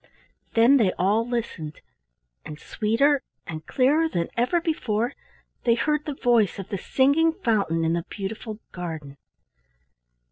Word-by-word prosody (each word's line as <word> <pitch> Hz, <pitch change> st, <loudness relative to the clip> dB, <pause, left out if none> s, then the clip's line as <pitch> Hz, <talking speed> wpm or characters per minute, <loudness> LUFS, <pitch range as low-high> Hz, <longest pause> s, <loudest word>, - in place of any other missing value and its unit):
Then 235 Hz, +5 st, +6 dB
they 210 Hz, -7 st, +3 dB
all 210 Hz, +6 st, +1 dB
listened, 185 Hz, -11 st, -4 dB, 0.6 s
and 150 Hz, 0 st, -9 dB
sweeter 245 Hz, -, +1 dB, 0.2 s
and 155 Hz, -1 st, -7 dB
clearer 295 Hz, +5 st, +3 dB
than 170 Hz, -, -2 dB
ever 250 Hz, +9 st, +2 dB
before 245 Hz, -9 st, -1 dB, 0.5 s
they 235 Hz, -1 st, +4 dB
heard 300 Hz, +4 st, 0 dB
the 295 Hz, -, -4 dB
voice 235 Hz, -7 st, +2 dB
of 195 Hz, -1 st, -7 dB
the 200 Hz, -, -2 dB
singing 285 Hz, -, +3 dB
fountain 200 Hz, -, 0 dB
in 165 Hz, -, +1 dB
the 170 Hz, 0 st, -1 dB
beautiful 215 Hz, +2 st, -5 dB
garden. 160 Hz, -6 st, -6 dB
225 Hz, 135 wpm, -25 LUFS, 180-270 Hz, 0.6 s, Then